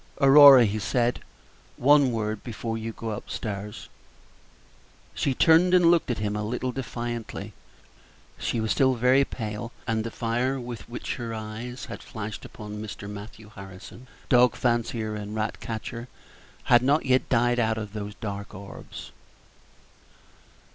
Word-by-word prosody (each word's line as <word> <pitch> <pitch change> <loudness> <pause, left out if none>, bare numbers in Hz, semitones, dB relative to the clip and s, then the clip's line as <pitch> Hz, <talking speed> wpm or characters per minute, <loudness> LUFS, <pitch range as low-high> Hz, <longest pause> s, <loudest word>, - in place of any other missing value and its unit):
"Aurora," 135 -2 +9
he 105 +1 -1
said, 120 +3 0 0.6
"one 140 0 +5
word 110 -2 -3
before 115 -1 -4
you 115 0 -4
go 115 0 -6
up 105 - -7
stairs." 105 -1 -5 1.3
She 135 - -1
turned 170 +5 +5
and 175 -2 +6
looked 170 -5 +2
at 120 - 0
him 105 -1 -2
a 105 - -2
little 125 +4 -2
defiantly; 120 -4 -5 0.9
she 115 - -1
was 110 -1 -1
still 130 -2 +3
very 125 +3 +4
pale, 115 -2 -5
and 110 -1 0
the 115 - -4
fire 120 +4 -1
with 120 -4 -8
which 120 - -5
her 115 -2 -5
eyes 110 +4 -6
had 115 - -8
flashed 110 -1 -7
upon 105 0 -8
Mr. 105 -2 -7
Matthew 105 +1 -10
Harrison, 100 +5 -11 0.2
dog 125 -1 +5
fancier 120 -2 -1
and 105 0 -6
rat 110 0 -2
catcher, 115 +2 -6 0.6
had 120 -1 +5
not 140 +4 +2
yet 130 -1 +2
died 120 0 +2
out 110 -1 +1
of 105 -2 -6
those 105 -1 -6
dark 100 -1 -6
orbs. 100 +1 -10
115 Hz, 145 wpm, -26 LUFS, 105-125 Hz, 1.3 s, Aurora